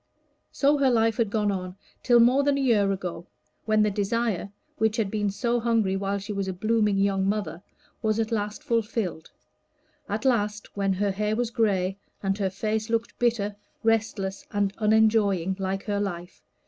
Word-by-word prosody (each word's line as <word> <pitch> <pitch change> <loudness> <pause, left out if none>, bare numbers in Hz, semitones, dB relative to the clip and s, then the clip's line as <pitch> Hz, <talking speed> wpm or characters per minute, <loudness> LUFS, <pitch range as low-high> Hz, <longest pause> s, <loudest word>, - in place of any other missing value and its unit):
So 285 +1 +2
her 275 -1 +4
life 225 -2 +2
had 230 -4 +1
gone 210 -1 +1
on 185 -1 -4 0.3
till 240 -2 +5
more 250 +4 +5
than 280 0 +2
a - - -1
year 210 -6 +3
ago, 180 -3 -5 0.4
when 215 -1 +3
that 210 -1 +1
desire 205 -1 -1 0.3
which 220 +1 +2
had 210 -4 0
been 205 -1 0
so 235 +4 0
hungry 225 -5 +1
when 195 +1 -1
she 200 +1 -5
was 195 -1 -2
a 190 - -2
blooming 210 +1 +1
young 195 -1 +1
mother, 195 -5 -2 0.4
was 215 0 +1
at 225 +1 -1
last 210 -2 -2
fulfilled 220 -7 -2 0.8
at - - -3
last, 210 -4 0
when 195 -1 +1
her 200 +1 0
hair 210 +2 -1
was 240 0 -1
gray, 195 -4 0 0.2
and 195 0 +1
her 195 -2 +1
face 215 +3 -2
looked 230 0 -2
bitter, 225 -4 +1 0.3
restless, 215 -3 0
and 200 -1 0
unenjoying, 210 -4 +3
like 195 0 -2
her 205 -1 -1
life. 180 -3 -5
210 Hz, 175 wpm, -26 LUFS, 195-225 Hz, 0.8 s, till